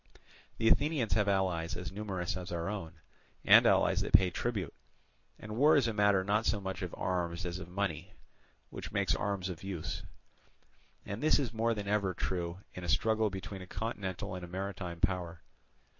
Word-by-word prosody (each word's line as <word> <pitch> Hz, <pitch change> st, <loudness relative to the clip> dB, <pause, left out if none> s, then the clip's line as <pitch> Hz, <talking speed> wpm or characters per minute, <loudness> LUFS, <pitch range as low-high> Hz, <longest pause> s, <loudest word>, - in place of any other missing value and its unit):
The 115 Hz, -, +1 dB
Athenians 145 Hz, -3 st, +3 dB
have 105 Hz, -2 st, +2 dB
allies 95 Hz, -4 st, 0 dB
as 90 Hz, -, -5 dB
numerous 95 Hz, -3 st, -3 dB
as 90 Hz, -1 st, -6 dB
our 85 Hz, +1 st, -2 dB
own, 95 Hz, -6 st, -5 dB, 0.5 s
and -, -, +8 dB
allies -, -, +4 dB
that -, -, -4 dB
pay 90 Hz, -1 st, +6 dB
tribute, 105 Hz, -6 st, -2 dB, 0.6 s
and 105 Hz, 0 st, -7 dB
war 150 Hz, +6 st, +6 dB
is 135 Hz, -5 st, +4 dB
a 115 Hz, -, -1 dB
matter 105 Hz, -2 st, +3 dB
not 105 Hz, +3 st, +1 dB
so 105 Hz, -, +2 dB
much 95 Hz, 0 st, -5 dB
of 90 Hz, -2 st, -4 dB
arms 90 Hz, -1 st, -1 dB
as 90 Hz, +1 st, -3 dB
of 95 Hz, -, -8 dB
money, 95 Hz, -1 st, -3 dB, 0.6 s
which -, -, -7 dB
makes 100 Hz, -5 st, +1 dB
arms 100 Hz, 0 st, -1 dB
of 90 Hz, -4 st, -6 dB
use. 85 Hz, -2 st, -4 dB, 1.0 s
And 100 Hz, +4 st, -5 dB
this 155 Hz, -, +5 dB
is 125 Hz, -6 st, -2 dB
more 115 Hz, +1 st, +1 dB
than 105 Hz, -1 st, -5 dB
ever 100 Hz, -3 st, +1 dB
true 90 Hz, 0 st, -3 dB
in 90 Hz, -, -7 dB
a 85 Hz, -, -4 dB
struggle 110 Hz, +6 st, +2 dB
between 95 Hz, 0 st, -6 dB
a 90 Hz, -, -9 dB
continental 95 Hz, -5 st, -4 dB
and 90 Hz, -1 st, -6 dB
a -, -, -6 dB
maritime 90 Hz, -2 st, -5 dB
power. 90 Hz, -4 st, -1 dB
95 Hz, 185 wpm, -32 LUFS, 90-105 Hz, 1.0 s, and